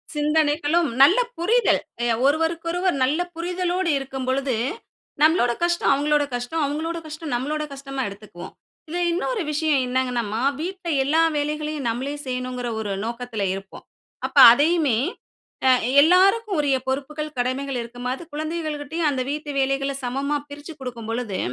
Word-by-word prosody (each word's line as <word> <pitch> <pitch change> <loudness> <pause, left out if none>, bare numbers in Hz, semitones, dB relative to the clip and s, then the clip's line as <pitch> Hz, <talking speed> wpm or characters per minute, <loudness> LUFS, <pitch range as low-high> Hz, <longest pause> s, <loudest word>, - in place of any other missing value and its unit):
சிந்தனைகளும், 300 +2 +2
நல்ல 350 - +7 0.2
புரிதல் 455 +8 +2 0.2
எ - - +1 0.2
ஒருவருக்கொருவர் 335 +4 +1
நல்ல 285 +6 +1 0.2
புரிதலோடு 360 +1 -1
இருக்கும் 265 -1 -5
பொழுது, 260 -1 0 0.7
நம்பளோட 310 -5 +4
கஷ்டம் 345 0 +2
அவுங்களோட 295 +1 +2
கஷ்டம், 245 +7 -2
அவுங்களோட 315 +4 -3
கஷ்டம் 310 -2 -6
நம்ளோட 300 +5 -2
கஷ்டமா 275 -1 -5
எடுத்துக்குவோம். 200 -3 -11 0.3
இதுல 350 +3 -3
இன்னொரு 420 +6 -1
விஷயம் 300 -2 +1
என்னங்கன்னாம்மா, 245 -4 -1 0.2
வீட்ல 370 0 -5 0.2
எல்லா 310 +4 +2 0.2
வேலைகளையும் 300 -2 -2
நம்மளே 260 +5 -3
செய்யணுங்கிற 250 -1 -3
ஒரு 205 -2 -3
நோக்கத்துல 235 -2 -4
இருப்போம். 195 0 -9 0.4
அப்ப - - -5
அதையுமே, 290 -2 +3 0.7
அ - - +7 0.3
எல்லாருக்கும் 385 +5 +4
உரிய 280 -2 +2
பொறுப்புகள் 300 +2 -3
கடமைகள் 260 +2 -1
இருக்கும். 245 +1 -7
அது 270 - -8
குழந்தைகள்கிட்டயும் 310 0 -2
அந்த 260 -2 -1
வீட்டு 300 0 -5
வேலைகள 275 +1 0
சமமா 275 +4 -1
பிரிச்சு 290 +3 -9
குடுக்கும் 235 -4 -7
பொழுது, 230 -5 -3
290 Hz, 130 wpm, -23 LUFS, 255-325 Hz, 0.7 s, நல்ல